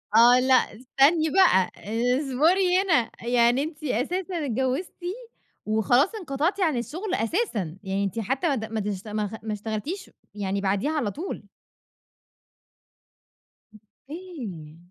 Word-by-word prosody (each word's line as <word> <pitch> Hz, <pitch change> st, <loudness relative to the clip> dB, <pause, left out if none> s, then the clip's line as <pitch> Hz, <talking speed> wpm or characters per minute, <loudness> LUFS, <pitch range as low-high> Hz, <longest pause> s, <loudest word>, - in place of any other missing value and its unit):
آه 240 Hz, +2 st, +7 dB
لأ 260 Hz, +1 st, +4 dB, 0.2 s
استني 280 Hz, +7 st, +3 dB
بقى، 290 Hz, -, +4 dB, 0.5 s
اصبري 335 Hz, +7 st, +2 dB
هنا، 325 Hz, -, +2 dB
يعني 240 Hz, +2 st, +3 dB
أنتِ 310 Hz, 0 st, -7 dB
أساسًا 330 Hz, -, -2 dB
اتجوّزتِ 265 Hz, -, -1 dB, 0.7 s
وخلاص 245 Hz, -, +2 dB
انقطعتِ 340 Hz, 0 st, -1 dB
عن 315 Hz, -8 st, +2 dB
الشغل 355 Hz, -, -4 dB
أساسًا، 225 Hz, -, -1 dB
يعني 195 Hz, 0 st, -1 dB
أنتِ 200 Hz, +3 st, -2 dB
حتّى 265 Hz, -, -1 dB
ما 285 Hz, -, +2 dB
د 220 Hz, -3 st, -3 dB
ما 220 Hz, -, 0 dB
تش 200 Hz, -1 st, -4 dB
ما 210 Hz, 0 st, -2 dB
خ 200 Hz, -, -11 dB
ما 220 Hz, -1 st, -3 dB
اشتغلتيش 220 Hz, -, -5 dB, 0.2 s
يعني 200 Hz, -1 st, -2 dB
بعديها 200 Hz, +9 st, 0 dB
على 285 Hz, -10 st, -1 dB
طول؟ 335 Hz, -, -6 dB, 2.3 s
أوكي. 215 Hz, -, -10 dB
255 Hz, 125 wpm, -25 LUFS, 215-325 Hz, 2.3 s, آه